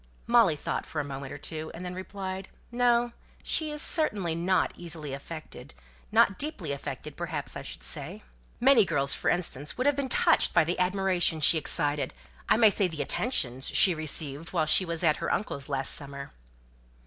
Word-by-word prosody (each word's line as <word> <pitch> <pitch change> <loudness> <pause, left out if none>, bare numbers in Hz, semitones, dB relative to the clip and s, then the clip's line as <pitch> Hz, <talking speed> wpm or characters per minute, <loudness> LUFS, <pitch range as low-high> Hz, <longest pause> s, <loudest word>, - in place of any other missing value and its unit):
Molly 230 -9 +4
thought - - -4
for 155 - -4
a - - -1
minute 140 -1 -7
or 145 - -7
two, 155 +1 -5
and 180 +2 -8
then 180 - -5
replied 190 0 -6 0.2
"No, 240 0 +2 0.3
she 305 -2 0
certainly 215 - +1
is 165 - -4
not 185 +2 +1
easily 160 -5 -6
affected 155 - -9 0.4
not 195 - +3
deeply 280 - -3
affected 140 - -6
perhaps - - -5
I - - -5
should - - -8
say." - - -6 0.4
"Many 250 -2 +6
girls, 140 -6 +3
for - - -1
instance, 150 -5 0
would 255 - -1
have 285 0 +3
been 275 -1 -3
touched - - +3
by - - +6
the 170 +3 -2
admiration 185 -3 +1
she 160 +2 +5
excited 145 - -1 0.3
I - - +5
may 220 -2 +6
say 195 0 +1
the 160 -4 -4
attentions 135 - +1
she 185 - +5
received 155 0 -2
when 160 -3 +1
she 155 +4 +5
was 170 0 -2
at 155 -3 +3
her 165 - -3
uncle's 140 -9 -3
last 135 -1 -1
summer." 140 -1 -7
170 Hz, 185 wpm, -28 LUFS, 150-200 Hz, 0.4 s, Many